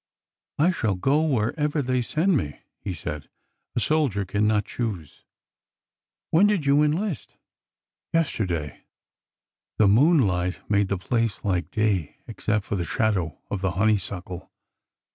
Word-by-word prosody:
^' 150 Hz, -, +5 dB
I 180 Hz, -, +4 dB
shall 110 Hz, -, 0 dB
go 135 Hz, +11 st, +2 dB
wherever 150 Hz, +2 st, 0 dB
they 125 Hz, 0 st, 0 dB
send 165 Hz, +9 st, +1 dB
me,'^ 75 Hz, -, -2 dB, 0.2 s
he 100 Hz, -, -5 dB
said; 75 Hz, -4 st, -6 dB, 0.5 s
a -, -, +2 dB
sol 155 Hz, +5 st, +2 dB
dier 100 Hz, -4 st, -3 dB
cannot 105 Hz, +2 st, +1 dB
choose." 100 Hz, -, -5 dB, 0.5 s
'' -, -, -67 dB
When 185 Hz, +6 st, +5 dB
did 200 Hz, -8 st, +1 dB
you 140 Hz, +1 st, +4 dB
enlist? 160 Hz, +4 st, -1 dB, 0.4 s
" -, -, -67 dB
Yesterday." 95 Hz, -, -1 dB, 0.9 s
The 105 Hz, -, +5 dB
moonlight 100 Hz, -, +3 dB
made 100 Hz, -1 st, +2 dB
the 100 Hz, -, -1 dB
place 115 Hz, +2 st, -1 dB
like 90 Hz, -3 st, 0 dB
day, 105 Hz, -8 st, 0 dB
except 110 Hz, -2 st, -2 dB
for -, -, -2 dB
the 90 Hz, -, -1 dB
shadow 95 Hz, -4 st, 0 dB
of 100 Hz, -, -2 dB
the 95 Hz, -2 st, 0 dB
honeysuckle. 95 Hz, -3 st, -1 dB
105 Hz, 145 wpm, -25 LUFS, 95-145 Hz, 0.9 s, ^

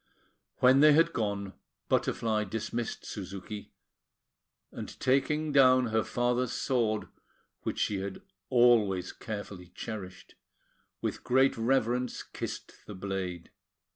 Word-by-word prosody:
When 130 Hz, +2 st, +6 dB
they 150 Hz, +1 st, +8 dB
had 165 Hz, +3 st, +4 dB
gone, 100 Hz, -3 st, -2 dB, 0.3 s
Butterfly 110 Hz, -2 st, +1 dB
dismissed 115 Hz, +2 st, -4 dB
Suzuki, 100 Hz, +1 st, -7 dB, 1.0 s
and, -, -, -8 dB
taking 150 Hz, +4 st, +1 dB
down 130 Hz, -3 st, +5 dB
her 110 Hz, 0 st, +1 dB
father's 120 Hz, 0 st, 0 dB
sword, 115 Hz, -5 st, 0 dB, 0.5 s
which -, -, -3 dB
she 100 Hz, -2 st, 0 dB
had 95 Hz, 0 st, -6 dB, 0.3 s
always 115 Hz, -7 st, +4 dB
carefully 100 Hz, -4 st, -7 dB
cherished, 95 Hz, -5 st, -7 dB, 0.7 s
with -, -, -3 dB
great 130 Hz, +2 st, +3 dB
reverence 125 Hz, +1 st, 0 dB
kissed -, -, -7 dB
the 105 Hz, -, -7 dB
blade. 95 Hz, -3 st, -4 dB
115 Hz, 110 wpm, -30 LUFS, 100-125 Hz, 1.0 s, they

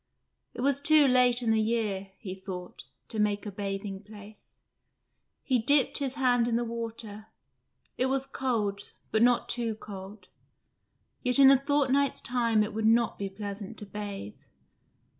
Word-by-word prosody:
It -, -, -5 dB
was 280 Hz, +1 st, +1 dB
too 300 Hz, -1 st, +6 dB
late 250 Hz, -1 st, +4 dB
in 225 Hz, -, +2 dB
the 220 Hz, 0 st, +3 dB
year, 215 Hz, -4 st, -1 dB
he 185 Hz, -4 st, -7 dB
thought, 190 Hz, -1 st, -8 dB, 0.2 s
to 220 Hz, -, -3 dB
make 205 Hz, 0 st, 0 dB
a 205 Hz, -, -5 dB
bathing 195 Hz, 0 st, -5 dB
place. 210 Hz, 0 st, -14 dB, 0.9 s
He 255 Hz, -3 st, +1 dB
dipped 275 Hz, +5 st, +2 dB
his 270 Hz, -2 st, -2 dB
hand 245 Hz, -3 st, +2 dB
in 235 Hz, -, 0 dB
the 240 Hz, -, +1 dB
water: 225 Hz, -2 st, -6 dB, 0.7 s
it 255 Hz, -, +3 dB
was 270 Hz, 0 st, 0 dB
cold, 215 Hz, -8 st, -2 dB, 0.2 s
but 220 Hz, -, +2 dB
not 245 Hz, 0 st, +3 dB
too 235 Hz, -2 st, -2 dB
cold. 195 Hz, -2 st, -10 dB, 0.9 s
Yet 250 Hz, 0 st, +1 dB
in 270 Hz, -1 st, +8 dB
a 275 Hz, -, +5 dB
fortnight's 280 Hz, -1 st, +2 dB
time 230 Hz, -3 st, +1 dB
it 210 Hz, -, -5 dB
would 220 Hz, 0 st, 0 dB
not 230 Hz, +1 st, +2 dB
be 200 Hz, -1 st, -3 dB
pleasant 200 Hz, +2 st, -7 dB
to 210 Hz, -, -8 dB
bathe. 200 Hz, -, -7 dB
225 Hz, 160 wpm, -28 LUFS, 205-250 Hz, 0.9 s, in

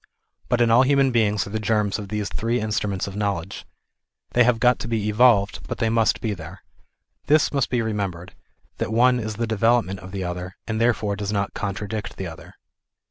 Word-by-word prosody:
But 120 Hz, -, +2 dB
in 115 Hz, -1 st, +4 dB
all 120 Hz, +2 st, +6 dB
human 135 Hz, 0 st, +3 dB
beings 105 Hz, -4 st, +1 dB
are 100 Hz, -, -9 dB
the 110 Hz, -, -2 dB
germs 105 Hz, -2 st, 0 dB
of 105 Hz, -, -6 dB
these 105 Hz, -1 st, -2 dB
three 115 Hz, +4 st, -1 dB
in 110 Hz, -1 st, -3 dB
struments 100 Hz, -3 st, -1 dB
of 100 Hz, -, -7 dB
knowledge. 100 Hz, -3 st, -3 dB, 0.6 s
They 125 Hz, -, +4 dB
have 120 Hz, -1 st, +2 dB
got 125 Hz, 0 st, +3 dB
to -, -, -5 dB
be 110 Hz, -3 st, -1 dB
evolved, 105 Hz, -2 st, +4 dB
but -, -, -4 dB
they 115 Hz, -1 st, 0 dB
must 115 Hz, -2 st, +2 dB
be 110 Hz, -2 st, -1 dB
there. 95 Hz, -, -10 dB, 0.6 s
This 150 Hz, +1 st, +3 dB
must 140 Hz, -3 st, +1 dB
be 120 Hz, -2 st, 0 dB
remembered 100 Hz, -5 st, -3 dB
ŌĆö -, -, -34 dB
that 110 Hz, -, -3 dB
one 125 Hz, +2 st, +4 dB
is 110 Hz, -1 st, -4 dB
the 115 Hz, -, -1 dB
development 110 Hz, -3 st, +1 dB
of 95 Hz, +2 st, -11 dB
the 95 Hz, -1 st, -4 dB
other, 90 Hz, +1 st, -5 dB
and 110 Hz, 0 st, -2 dB
therefore 110 Hz, -3 st, +1 dB
does 100 Hz, 0 st, -3 dB
not 100 Hz, -1 st, -1 dB
contradict 105 Hz, +2 st, -4 dB
the 95 Hz, -, -4 dB
other. 80 Hz, -2 st, -10 dB
110 Hz, 210 wpm, -23 LUFS, 100-115 Hz, 0.6 s, all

